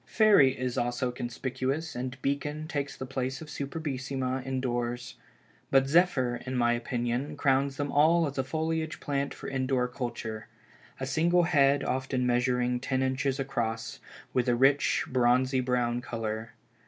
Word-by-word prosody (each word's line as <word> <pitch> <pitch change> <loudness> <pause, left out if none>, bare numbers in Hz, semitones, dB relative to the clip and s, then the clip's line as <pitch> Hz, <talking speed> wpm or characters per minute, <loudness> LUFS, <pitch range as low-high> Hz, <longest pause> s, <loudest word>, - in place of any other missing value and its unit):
Fairy 200 - +5
is 125 -1 -2
also 120 +1 -1
conspicuous, 130 +5 -3
and 125 +1 -4
Beacon 150 +2 -2
takes 145 -4 -3
the 130 - -5
place 130 +1 -3
of 160 - -10
Superbissima 135 -3 -3
indoors, 120 -2 -2 0.6
but 135 -1 +4
Zephyr, 135 -6 +2
in 130 0 -4
my 120 -1 +3
opinion 120 +4 -2
crowns 135 0 +2
them 145 -1 -2
all 160 +3 +4
as 140 -2 -4
a - - +2
foliage 160 +2 -2
plant 140 -1 -2
for - - -8
indoor 130 -1 0
culture; 120 -4 -5 0.5
a 130 - -2
single 170 +5 +3
head 140 -3 +3
often 130 -1 -1
measuring 125 0 +1
ten 130 +1 -1
inches 135 +1 0
across, 115 -4 -3 0.3
with 125 -1 +1
a 120 - +3
rich 135 +3 +3
bronzy 130 +1 +2
brown 125 -1 0
color. 115 -1 -4
130 Hz, 145 wpm, -29 LUFS, 125-140 Hz, 0.6 s, Fairy